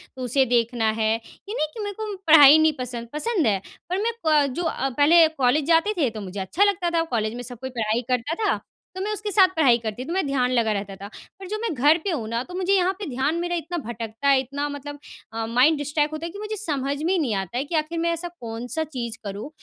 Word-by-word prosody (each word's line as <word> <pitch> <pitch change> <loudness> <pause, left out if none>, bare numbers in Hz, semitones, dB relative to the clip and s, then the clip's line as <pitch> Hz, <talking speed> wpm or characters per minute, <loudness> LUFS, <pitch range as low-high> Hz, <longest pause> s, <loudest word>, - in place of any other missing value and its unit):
तो 260 - -8
उसे 260 +2 +2
देखना 235 -2 +1
है। 220 0 +1
ये 230 - -10
नहीं 310 - 0
कि - - -9
मेरे 410 0 -4
को 425 -2 -4
पढ़ाई 300 -2 +9
नहीं 315 0 +4
पसंद, 245 -2 -4
पसंद 335 - 0
है। 200 -3 +1 0.3
पर 365 - 0
मैं 465 - +1
प 300 -2 +4
जो 350 - -3
अ, 295 -4 -1
पहले 315 +5 +5
कॉलेज 280 -1 +1
जाते 335 +5 +3
थे 285 -7 +2
तो 220 -1 -8
मुझे 195 0 -6
अच्छा 190 - +1
लगता 380 -4 +1
था। 335 -1 +1
कॉलेज 215 -1 -1
में 245 - -5
सब 245 -1 -8
कोई 260 - -5
पढ़ाई 230 -2 -1
करता 250 +5 0
था - - +1 0.4
तो 375 - -4
मैं 415 +2 -2
उसके 420 0 -3
साथ 385 -2 +6
पढ़ाई 270 -7 +5
करती 225 0 -5
थी - - -11
तो 335 - -3
मैं 380 -2 0
ध्यान 255 -2 +1
लगा 230 -3 +2
रहता 200 -1 -4
था। 195 +1 -9 0.3
पर 385 - -8
जो 425 +3 -3
मैं 460 -6 -1
घर 295 +4 +4
पे 395 - -1
हूँ 250 -10 -3
ना 230 +1 -1
तो 355 - -12
मुझे 375 +1 +1
यहाँ 375 -1 +3
पे 410 - -4
ध्यान 270 +5 0
मेरा 350 0 -2
इतना 345 +1 -4
भटकता 230 +3 -4
है 275 -1 +5
इतना 280 +3 -3
मतलब 290 0 -7 0.3
अ, 225 0 -2
माइंड 250 +7 +3
डिस्ट्रैक्ट 295 +1 -1
होता 310 +2 -4
है 335 - -5
कि 400 - -9
मुझे 425 +1 -4
समझ 285 -8 -2
में 350 +4 +1
ही 370 - +1
नहीं 250 -9 0
आता 195 +4 -3
है 260 - 0
कि 330 - -4
आखिर 315 +2 -1
मैं 335 +1 +1
ऐसा 335 +1 -4
कौन 230 0 -6
सा 320 - +2
चीज़ 245 -7 -5
करूँ 205 +5 -6
285 Hz, 265 wpm, -24 LUFS, 235-335 Hz, 0.4 s, पढ़ाई